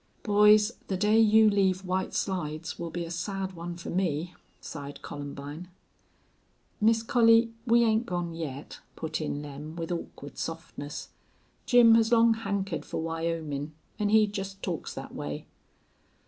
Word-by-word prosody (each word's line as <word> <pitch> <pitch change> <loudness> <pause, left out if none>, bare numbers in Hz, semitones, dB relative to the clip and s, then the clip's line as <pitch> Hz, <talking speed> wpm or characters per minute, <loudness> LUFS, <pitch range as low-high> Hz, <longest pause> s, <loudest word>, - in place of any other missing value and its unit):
"Boys, 210 +1 +5 0.2
the 190 - -1
day 210 +3 +4
you 220 0 +6
leave 190 -2 +2
White 185 +1 -2
Slides 165 -4 -3
will 170 - -4
be 170 +1 -4
a 165 - -8
sad 190 +2 -3
one 170 0 -6
for 170 - -6
me," 175 -2 -1 0.3
sighed 145 -2 -8
Columbine. 145 +3 -7 1.1
"Miss 225 +1 +4
Collie, 230 0 +4
we 235 +1 +5
'ain't 225 +1 +2
gone 175 -2 -2
yet," 150 -4 -6 0.2
put 160 0 -3
in 150 -1 -3
Lem, 150 +2 -8
with 165 0 -4
awkward 155 -4 -6
softness. 160 -2 -6 0.6
"Jim 240 -2 +7
has 225 0 +4
long 230 -1 +6
hankered 200 -5 -3
fer - - -6
Wyomin' 160 -3 -3 0.3
an' 210 -1 +1
he 215 0 +6
jest 195 -1 -6
talks 175 -4 -4
thet - - -7
way." 75 0 -5
180 Hz, 150 wpm, -28 LUFS, 160-210 Hz, 1.1 s, Jim